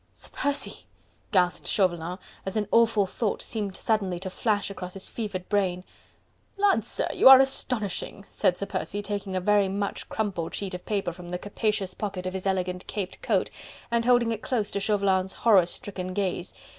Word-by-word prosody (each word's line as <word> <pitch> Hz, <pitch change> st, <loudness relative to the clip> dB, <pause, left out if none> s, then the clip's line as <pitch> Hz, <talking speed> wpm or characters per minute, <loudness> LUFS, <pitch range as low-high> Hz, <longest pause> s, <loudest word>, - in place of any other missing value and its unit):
"Sir -, -, -9 dB
Percy!..." 285 Hz, 0 st, -1 dB, 0.4 s
gasped 180 Hz, -4 st, +2 dB
Chauvelin, 175 Hz, -2 st, +1 dB, 0.3 s
as 195 Hz, +3 st, -3 dB
an 210 Hz, -2 st, 0 dB
awful 230 Hz, -3 st, +4 dB
thought 205 Hz, +2 st, -2 dB
seemed 205 Hz, -4 st, -3 dB
suddenly 200 Hz, -5 st, 0 dB
to 190 Hz, +1 st, -6 dB
flash 205 Hz, -1 st, 0 dB
across 180 Hz, -2 st, -7 dB
his 195 Hz, -, -6 dB
fevered 205 Hz, -5 st, -5 dB
brain. 185 Hz, -3 st, 0 dB, 0.7 s
"Lud, 400 Hz, -1 st, +3 dB
sir, -, -, -2 dB
you -, -, +7 dB
are 265 Hz, -1 st, +11 dB
astonishing!" 225 Hz, -7 st, -1 dB
said 185 Hz, -3 st, +1 dB
Sir 200 Hz, -, -3 dB
Percy, 205 Hz, +1 st, -3 dB
taking 200 Hz, -1 st, -4 dB
a -, -, +2 dB
very 205 Hz, +1 st, +3 dB
much 200 Hz, +1 st, -3 dB
crumpled 195 Hz, -7 st, -2 dB
sheet 195 Hz, -2 st, -4 dB
of 180 Hz, -, -7 dB
paper 195 Hz, -5 st, -1 dB
from 175 Hz, 0 st, -10 dB
the 180 Hz, -, -2 dB
capacious 205 Hz, -1 st, -2 dB
pocket 195 Hz, -4 st, -4 dB
of 185 Hz, -, -3 dB
his 190 Hz, 0 st, -3 dB
elegant 180 Hz, -1 st, -1 dB
caped 195 Hz, -3 st, -5 dB
coat, -, -, +1 dB, 0.4 s
and 235 Hz, 0 st, +1 dB
holding 245 Hz, -2 st, +4 dB
it 225 Hz, -1 st, -3 dB
close 220 Hz, -5 st, -1 dB
to 200 Hz, -, -1 dB
Chauvelin's 195 Hz, -2 st, +1 dB
horror 200 Hz, -7 st, +5 dB
stricken 185 Hz, -2 st, -5 dB
gaze. 185 Hz, -3 st, -2 dB
200 Hz, 180 wpm, -27 LUFS, 185-215 Hz, 0.7 s, are